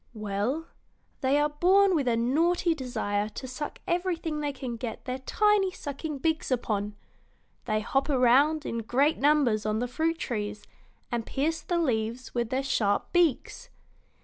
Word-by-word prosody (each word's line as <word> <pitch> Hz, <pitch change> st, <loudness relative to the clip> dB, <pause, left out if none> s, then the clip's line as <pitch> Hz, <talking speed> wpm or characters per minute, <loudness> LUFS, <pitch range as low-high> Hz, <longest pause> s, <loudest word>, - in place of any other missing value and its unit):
"Well, 215 Hz, +9 st, -2 dB, 0.5 s
they 270 Hz, +1 st, +2 dB
are 295 Hz, 0 st, +2 dB
born 375 Hz, +6 st, +4 dB
with 290 Hz, -6 st, +1 dB
a 230 Hz, -1 st, +2 dB
naughty 330 Hz, +8 st, +2 dB
desire 220 Hz, -7 st, -2 dB
to 260 Hz, -, -7 dB
suck 275 Hz, +4 st, -5 dB
everything 345 Hz, -3 st, -1 dB
they 290 Hz, -1 st, -1 dB
can 260 Hz, -3 st, -5 dB
get 230 Hz, 0 st, -6 dB
their 255 Hz, 0 st, -3 dB
tiny 415 Hz, +7 st, +2 dB
sucking 295 Hz, -3 st, -5 dB
beaks 320 Hz, +2 st, -1 dB
upon. 210 Hz, -5 st, -1 dB, 0.7 s
They 215 Hz, 0 st, 0 dB
hop 270 Hz, +6 st, 0 dB
around 280 Hz, +4 st, +4 dB
in 230 Hz, -, -2 dB
great 265 Hz, +7 st, +1 dB
numbers 280 Hz, -7 st, +3 dB
on 215 Hz, 0 st, 0 dB
the 245 Hz, +2 st, -1 dB
fruit 320 Hz, +6 st, -1 dB
trees 210 Hz, -7 st, -4 dB, 0.5 s
and 235 Hz, -1 st, -1 dB
pierce 305 Hz, +7 st, -1 dB
the 350 Hz, -, -1 dB
leaves 240 Hz, -5 st, -1 dB
with 235 Hz, -2 st, -1 dB
their 260 Hz, +2 st, -1 dB
sharp 220 Hz, -5 st, 0 dB
beaks. 345 Hz, -7 st, +1 dB
270 Hz, 155 wpm, -28 LUFS, 230-315 Hz, 0.7 s, born